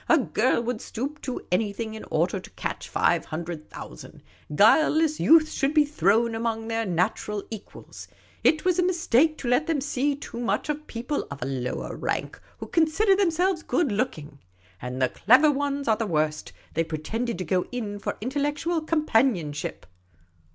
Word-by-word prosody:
A 330 - +7
girl 245 -3 +1
would 240 -1 -3
stoop 280 +6 -5
to 255 - -5
anything 215 +3 -1
in 220 - -8
order - - 0
to - - -12
catch - - -5
five - - +2
hundred 160 0 -6
thou - - -9
sand. - - -13 0.3
Guileless 310 - +4
youths 315 -1 +5
should 280 +1 0
be 300 -1 +6
thrown 230 - +2
among 225 0 -2
their 225 -1 -1
natural 185 +4 -1
equals. 220 -2 -10 0.4
It 310 +1 +3
was 365 -1 +2
a - - +4
mistake 320 -4 +2
to 250 - -6
let 250 +6 +2
them 325 -3 +1
see 280 0 0
too 275 -4 -8
much 240 +5 -1
of 300 +1 -3
people 245 +5 -3
of 140 0 -6
a - - -2
lower 130 -2 -3
rank - - -3 0.2
who - - -7
consider 335 +5 +3
themselves 360 -2 +1
good 320 -7 0
looking. 155 - -3 0.4
And 125 +1 -5
the 130 -1 +2
clever 265 +8 +5
ones 280 0 -2
were 220 - +4
the 225 - -2
worst: 155 -3 -1 0.2
they 165 - +1
pre 160 -1 -4
tended 225 +8 -3
to 185 - -4
go 180 +2 0
in 215 -5 -4
for - - -4
intellectual 290 +6 -1
companionship. 225 - 0
240 Hz, 175 wpm, -25 LUFS, 200-305 Hz, 0.4 s, A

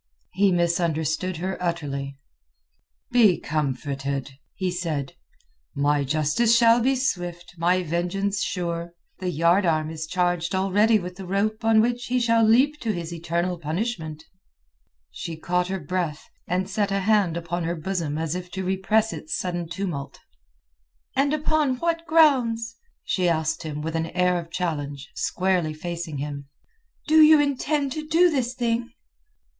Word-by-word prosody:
He 195 +1 +3
misunderstood 170 0 0
her 185 +3 -4
utterly. 140 -6 -3 0.9
"Be 220 -7 +5
comforted," 140 -2 -2 0.2
he 185 -2 -1
said. 160 -6 -3 0.6
"My 145 0 +2
justice 155 - +2
shall 230 0 +6
be 265 +3 +2
swift; 175 -9 -3
my 180 +2 +2
vengeance 180 +5 -1
sure. 170 -1 -3 0.2
The 185 - -2
yard 170 +4 +3
arm 155 -2 +1
is 160 0 -5
charged 175 0 0
already 205 +4 +3
with 180 -2 -6
the 190 -2 -8
rope 215 +4 -1
on 225 -1 +5
which 240 +1 -1
he 250 +1 +1
shall 230 -1 +3
leap 260 +7 +4
to 225 - -1
his 170 -3 -5
eternal 170 +1 -2
punishment." 160 -2 -3 0.9
She 165 - -6
caught 180 +2 0
her 190 +1 -3
breath, 165 -1 -3 0.2
and 185 +2 0
set 205 0 0
a 195 0 0
hand 200 -4 +2
upon 170 0 -3
her 170 +1 -1
bosom 165 -3 -3
as 160 -1 -2
if 180 0 -5
to 190 - -3
repress 210 +4 +1
its 315 - -4
sudden 175 -2 -3
tumult. 165 -7 -4 1.0
"And 275 +2 +2
upon 305 -3 +1
what 335 +4 -2
grounds," 245 -8 +3 0.3
she 180 -2 +1
asked 160 0 0
him 150 -2 -5
with 160 +1 -3
an 165 0 -1
air 180 +1 +1
of 165 -1 -9
challenge, 145 -6 -4
squarely 180 -4 0
facing 170 -1 -5
him, 140 0 -5 0.6
"do 315 +1 +6
you 310 0 +8
intend 285 0 0
to 305 +2 -5
do 340 +2 +4
this 255 -3 -1
thing?" 235 -1 -1
180 Hz, 150 wpm, -24 LUFS, 160-225 Hz, 1.0 s, you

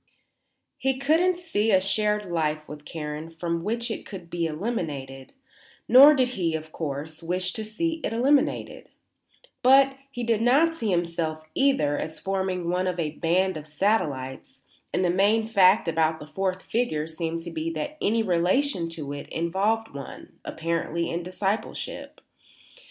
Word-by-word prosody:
He 265 -1 0
couldn't 325 +6 +3
see 275 -12 -1
a 190 -3 +5
shared 210 +2 +1
life 155 -2 -1
with 150 0 -10
Karen 155 0 -5
from 165 0 -3
which 235 +3 -2
it - - -4
could 180 -4 -10
be 170 -1 0
eliminated, 150 - -4 0.5
nor 275 +5 +9
did 255 -2 +2
he, 175 -9 -1
of 160 0 -6
course, 155 +1 -5
wish 180 +2 -2
to 220 - -4
see 320 +10 -2
it - - -1
eliminated; 265 +5 +1 0.7
but 270 +1 +6
he 245 -3 -5
did 225 -2 +1
not 285 +8 +4
see 225 -9 -2
himself, 170 -3 -1
either, 270 - +2
as 160 - -5
forming 190 -2 -2
one 180 +1 0
of 180 -1 -2
a 155 -3 -1
band 180 +3 +1
of 155 0 -9
satellites, 150 -6 -1 0.3
and 180 +1 +1
the 175 - +3
main 205 +4 +3
fact 195 -3 +5
about 160 -1 +1
the - - -9
fourth 185 +3 -2
figure 190 -11 -1
seemed 165 +1 -4
to 170 - -7
be 160 0 -3
that 165 - -5
any 225 +2 +2
relation 180 +2 +1
to 150 -4 -6
it 145 - -8
involved 200 +7 0
one, 140 -1 -10
apparently, 165 +1 -2
in 170 - -2
discipleship. 190 +4 -4
180 Hz, 155 wpm, -26 LUFS, 160-225 Hz, 0.7 s, nor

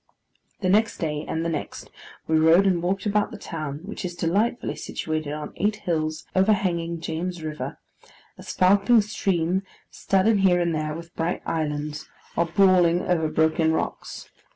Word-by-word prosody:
The 185 - +1
next 215 +4 +3
day, 150 -2 -3
and 160 +1 -2
the - - 0
next, 155 -3 -5 0.3
we 160 0 +2
rode 165 +5 +5
and 180 -3 +2
walked 190 +3 -1
about 210 0 +1
the - - -9
town, 155 -6 -6
which 210 - -6
is 175 -1 -4
delightfully 200 +9 0
situated 155 -2 -4
on 150 0 -6
eight 210 +1 +1
hills, 155 -5 -2
overhanging 180 -4 +1
James 170 +1 -4
River; 155 -1 -5 0.6
a - - -13
sparkling 200 +5 +4
stream, 190 -3 0 0.3
studded 200 +2 +2
here 185 -2 +4
and 170 -1 0
there 155 -1 -2
with 170 +1 -10
bright 165 +2 -2
islands, 150 -1 -3 0.3
or 170 - +1
brawling 180 -1 +4
over 165 -3 +1
broken 160 +1 +2
rocks. - - -4
170 Hz, 155 wpm, -24 LUFS, 160-190 Hz, 0.6 s, rode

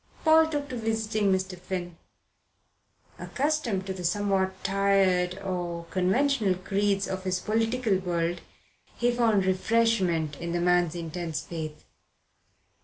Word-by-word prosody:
Paul 320 0 +6
took 290 -2 -3
to 255 - -5
visiting 220 -2 0
Mr. 190 0 -1
Finn. 180 -1 -5 1.2
Accustomed 270 -9 -1
to 190 - -3
the 185 -1 -7
somewhat 190 +1 0
tired 190 -2 +2
or 175 -3 -3
conventional 200 +2 +2
creeds 195 +1 0
of 190 0 -4
his 185 -1 -1
political 225 -1 0
world, 175 -1 -1 0.6
he 240 0 +2
found 225 -5 +2
refreshment 185 -6 +1
in 170 0 -4
the 175 - 0
man's 175 -1 +2
intense 165 -1 -4
faith. 155 -2 -7
190 Hz, 120 wpm, -27 LUFS, 180-220 Hz, 1.2 s, Paul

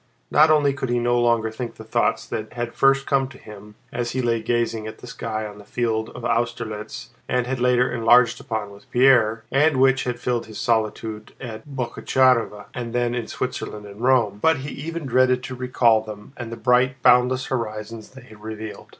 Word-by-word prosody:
Not 155 +2 +6
only 145 -3 +4
could 135 -2 -4
he 120 - +1
no 120 0 +2
longer 115 -2 +2
think 115 +1 -6
the - - -10
thoughts 110 - 0
that 110 0 -5
had 120 -1 -4
first 135 0 +3
come 135 -1 +1
to 135 0 -14
him 105 0 -13 0.2
as 120 -1 -2
he 130 - 0
lay 115 -1 +1
gazing 115 -1 -1
at 110 - -8
the - - -12
sky 110 -2 -4
on 105 -1 -9
the - - -12
field 110 0 -2
of 120 - -7
Austerlitz 115 -3 -3 0.2
and 125 -1 +1
had 130 0 -3
later 125 0 +3
enlarged 120 0 +4
upon 110 -3 -4
with 100 +6 -16
Pierre, 120 -3 +4
and 145 +1 +3
which 135 0 +3
had 125 -1 -3
filled 120 -2 -2
his 110 - -9
solitude 110 -2 -1
at 115 0 -8
Boguchárovo 125 -4 +1
and 120 -1 -5
then 120 -1 0
in 120 -2 -3
Switzerland 105 0 -5
and 100 +2 -11
Rome, 120 -6 +2
but 160 -1 +4
he - - -4
even 165 +3 -6
dreaded 130 0 +2
to 130 - -6
recall 125 -3 +3
them 105 +2 -10
and 120 -2 -7
the 115 - -6
bright 125 +1 +3
and 130 - -30
boundless 125 +1 +4
horizons 110 -2 -4
they 130 -2 -14
had 110 -3 -16
revealed. 110 0 -7
120 Hz, 200 wpm, -23 LUFS, 110-130 Hz, 0.2 s, Not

